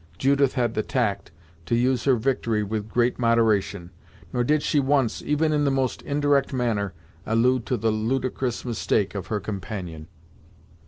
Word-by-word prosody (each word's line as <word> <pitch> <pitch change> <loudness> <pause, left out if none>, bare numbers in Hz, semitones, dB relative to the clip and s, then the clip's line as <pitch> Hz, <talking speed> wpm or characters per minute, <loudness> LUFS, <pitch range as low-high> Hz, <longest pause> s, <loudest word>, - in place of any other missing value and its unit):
Judith 140 0 +2
had 120 -4 0
the 110 - 0
tact 105 -5 -1 0.4
to 115 - +1
use 125 0 +1
her 135 -2 +5
victory 115 -3 0
with 105 +1 -4
great 120 +2 +1
moderation, 110 -6 +1 0.4
nor 120 - +1
did 150 +4 +2
she 150 - +2
once, 135 -3 +1
even 155 +1 +1
in 150 -1 +2
the 140 - +3
most 135 -2 -1
indirect 145 -1 +1
manner, 115 -7 -1 0.3
allude 120 +3 +1
to 125 - 0
the 110 +1 +1
ludicrous 125 +3 -2
mistake 110 -4 0
of 100 -2 -5
her 105 - -1
companion. 95 -5 -6
120 Hz, 160 wpm, -24 LUFS, 110-135 Hz, 0.4 s, her